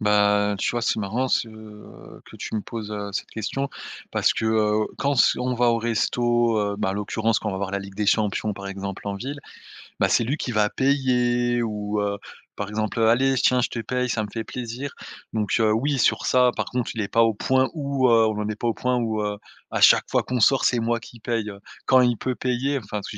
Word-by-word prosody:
Ben, 105 -1 +3
tu - - 0
vois 120 - -2
c'est 110 - +1
marrant 115 +6 -1
ce, 115 - +1
heu, 110 -1 -13
que - - -13
tu - - -6
me - - -1
poses, 110 -1 -7
heu, 100 -1 -4
cette - - -4
question, 120 +6 -3 0.4
parce - - +2
que, - - -3
heu, 110 -1 +2
quand 140 0 +1
s 125 - +4
on 125 0 -1
va 120 0 +2
au 115 - +1
resto, 120 0 +1
heu, 100 -1 -1
bah, 100 -2 -1
à - - -2
l'occurrence 110 +2 0
quand 110 - -4
on - - -2
va - - -3
avoir 95 0 -3
la 100 - -1
Ligue 100 0 -9
des 105 +1 -2
Champions, 105 0 +1
par 100 0 -8
exemple, 100 0 -6
en 100 - -2
ville, 135 +8 -5 0.6
bah, - - +3
c'est 115 - +3
lui 140 +7 -1
qui 125 - -3
va 105 -2 +2
payer 120 -3 +1
ou, 105 -1 -2
heu, 100 0 -1 0.4
par 100 -1 -4
exemple, 110 +1 -2
heu: 110 - +4
«Allez, 135 +3 +3
j - - +1
tiens, 125 -1 +3
je - - 0
te 120 - -5
paye, 125 +3 -1
ça 115 -2 -1
me - - -4
fait 115 -1 -4
plaisir», 125 +4 -6 0.4
donc, 105 -3 -1
heu, 110 -1 +3
oui, 140 +5 0
sur - - +2
ça, 125 -1 +4
par - - -1
contre, 125 -2 -2
il 115 - -3
est 100 - -2
pas 115 +3 +3
au 115 -1 +3
point 130 +5 +1
où, 140 -4 0
heu 115 -2 +5
on 110 - -1
n'en 105 0 -2
est 105 - -3
pas 120 - -3
au 115 - +1
point 125 0 0
où, 110 -2 -1
heu, 105 0 -2 0.3
à - - -2
chaque - - +7
fois - - +2
qu'on 125 -1 -2
sort, 135 +5 +4
c'est 120 - +3
moi 115 +1 0
qui 120 +1 -13
paye. 115 -2 -2 0.4
Quand 130 -1 +6
il 120 -3 +2
peut 130 -1 -2
payer, 130 +3 -1
enfin, 105 -6 -8
parce 100 - -6
que 105 - -7
115 Hz, 255 wpm, -24 LUFS, 105-125 Hz, 0.6 s, chaque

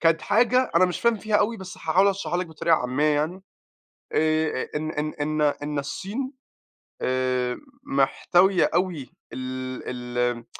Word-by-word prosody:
كانت 165 -1 +3
حاجة 245 +4 +3
أنا 180 - +6
مش 180 -1 -2
فاهم 235 -1 +3
فيها 215 0 +1
أوي، 215 +3 +1
بس 190 -2 -9
هاحاول 185 +5 +3
أشرحها 195 -3 -1
لِك 180 - -2
بطريقة 160 0 +2
عامية 130 +3 -1
يعني. 160 +6 -1 0.7
آآ 155 -3 +1
إن 155 +1 -2
إن 155 0 -3
إن 155 +1 -1
إن 145 0 0
الصين 220 - -4 0.7
آآ 130 -1 0 0.2
محتوية 175 +7 +3
أوي 175 -7 -1 0.2
ال 130 0 -5
ال 125 -1 -2
155 Hz, 140 wpm, -25 LUFS, 130-185 Hz, 0.7 s, أنا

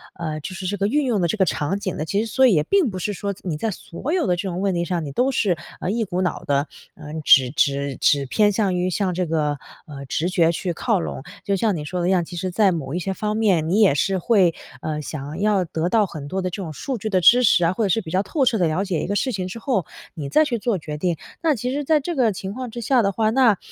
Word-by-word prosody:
呃， 155 -3 -4
就 170 +5 -7
是 185 - -6
这 205 +2 -2
个 200 +1 +1
运 290 +6 +1
用 235 -5 +1
的 170 - +2
这 165 - -1
个 195 - +4
场 165 +3 -1
景 185 -3 -3
的。 155 - -3
其 195 +5 -1
实 225 - -7
所 265 +2 +5
以 235 - +4
也 150 - +3
并 380 - +2
不 190 - -6
是 195 +3 -2
说， 200 +1 -4
你 165 -5 -3
在 225 - -1
所 210 - -5
有 360 -5 +1
的 180 - +2
这 185 - -3
种 180 +1 -3
问 195 -1 +1
题 170 0 -1
上， 175 -2 -2
你 140 - -5
都 250 - +1
是， 195 -9 +1 0.2
呃， 180 - -1
一 225 +2 0
股 180 -1 -2
脑 180 -4 -2
的， 140 +1 +1 0.3
呃， 150 - -10
只 130 -2 +7
只 140 -1 0
只 140 -2 +2
偏 205 +10 +3
向 195 -2 +1
于 180 +1 0
向 185 0 -1
这 180 +1 -1
个， 150 -3 0 0.3
呃， 140 -2 -9
直 160 +6 -1
觉 170 -3 +3
去 175 +2 -3
靠 200 +4 0
拢。 135 - -5 0.2
就 200 - 0
像 210 0 +1
你 150 - -4
说 180 +5 -4
的 175 - 0
一 - - +2
样， 180 -2 +3
其 175 +2 -9
实 185 +2 -2
在 200 +1 +3
某 155 -5 -4
一 175 - -1
些 190 +2 -2
方 210 +2 -2
面， 190 -8 +2
你 195 +6 +2
也 200 -8 +6
是 190 +6 +1
会， 190 -4 +3 0.3
呃， 150 -1 -3
想 150 +2 -6
要 205 -3 +2
得 165 +1 -2
到 215 +1 +3
很 155 -6 -8
多 190 +6 -2
的 185 - -2
这 190 +3 -6
种 165 - -6
数 260 - -4
据 215 - -3
的 190 -3 +2
支 245 +8 +7
持 200 -6 +4
啊， 170 - +2
或 220 - -1
者 - - 0
是 205 - +2
比 160 - -9
较 185 - +2
透 270 - 0
彻 235 - +2
地 175 - +3
了 160 +5 0
解 185 -5 -2
一 - - -3
个 200 - -1
事 260 +5 0
情 190 -5 -3
之 185 - -7
后， 230 - 0 0.3
你 150 -5 -5
再 310 - +4
去 240 -5 -2
做 220 -1 0
决 150 -2 -6
定。 175 -1 0 0.2
那 320 -3 +2
其 250 +2 -3
实 290 +1 -2
在 310 +2 +3
这 335 +4 -4
个 245 -5 +3
情 190 0 -6
况 255 +1 -5
之 240 - -6
下 250 +2 +3
的 200 -2 +1
话， 215 +2 +1
那 235 -5 +4
185 Hz, 320 characters per minute, -22 LUFS, 165-220 Hz, 0.3 s, 只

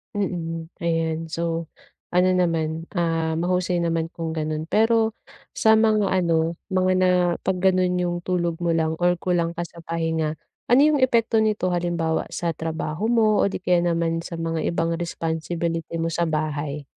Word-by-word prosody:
Mhm, 165 -4 -3
ayan, 165 -1 -1
so 165 0 -2 0.5
ano 185 +1 +4
naman, 165 -2 0
ah, 165 -2 0
mahusay 175 0 0
naman 165 -1 0
kung 165 -1 -3
gano'n. 155 -1 -2
Pero 225 0 +3 0.4
sa 220 0 +4
mga 215 -2 +3
ano, 170 -3 +1 0.2
mga 185 0 +2
na 185 0 +3 0.3
'pag 185 -1 0
ganon 185 -1 +2
'yong 175 -1 -2
tulog 175 -2 0
mo 170 - +2
lang 160 -1 +1
or 175 -1 +3
kulang 170 -2 0
ka 170 0 -4
sa 170 0 -14
pahinga, 160 -2 -2 0.3
ano 250 - +7
'yong 295 -2 +4
epekto 230 -3 +3
nito 210 -4 0
halimbawa 170 -2 0
sa 170 -3 -2
trabaho 160 +6 -2
mo 220 -3 +3
o 200 - +1
di - - -4
kaya 175 -1 +2
naman 165 0 -1
sa 165 -1 -6
mga 165 -1 -2
ibang 165 0 0
responsibility 165 0 -3
mo 165 - 0
sa 170 +1 -1
bahay? 150 -2 -2
170 Hz, 160 wpm, -23 LUFS, 165-185 Hz, 0.5 s, ano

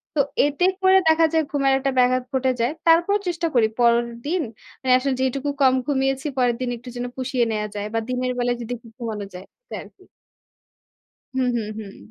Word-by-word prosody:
তো 285 - +4 0.2
এতে 290 +5 +1 0.2
করে 380 0 +6
দেখা 320 +1 +5
যায় 320 -1 +3
ঘুমের 275 -2 +2
একটা 275 0 0
ব্যাঘাত 255 0 +3
ঘটে 260 0 +2
যায়। 235 +4 +1 0.2
তারপরও 345 +5 +4
চেষ্টা 340 -1 -1
করি। 225 -2 +5
পরের 235 0 +4 0.2
দিন 345 +4 0 0.4
মানে 255 -1 +3
আসলে 265 +1 -1
যেটুকু 270 +2 -1
কম 260 -1 +6
ঘুমিয়েছি 270 0 0
পরের 245 -2 +2
দিন 250 - -1
একটু 245 +2 -11
যেন 245 - -3
পুষিয়ে 255 -2 0
নেয়া 210 -1 -2
যায় 205 0 -3
বা 225 - +1
দিনের 255 0 -1
বেলায় 245 0 0
যদি 235 +1 -7
একটু 230 0 -16
ঘুমানো 220 -4 -4
যায় 180 +1 -9 0.2
এটাই - - -7
আরকি। - - -19 1.3
হুম, 260 -1 +1
হুম, 220 -3 -2
হুম। 205 -3 -9
255 Hz, 195 wpm, -23 LUFS, 235-280 Hz, 1.3 s, করে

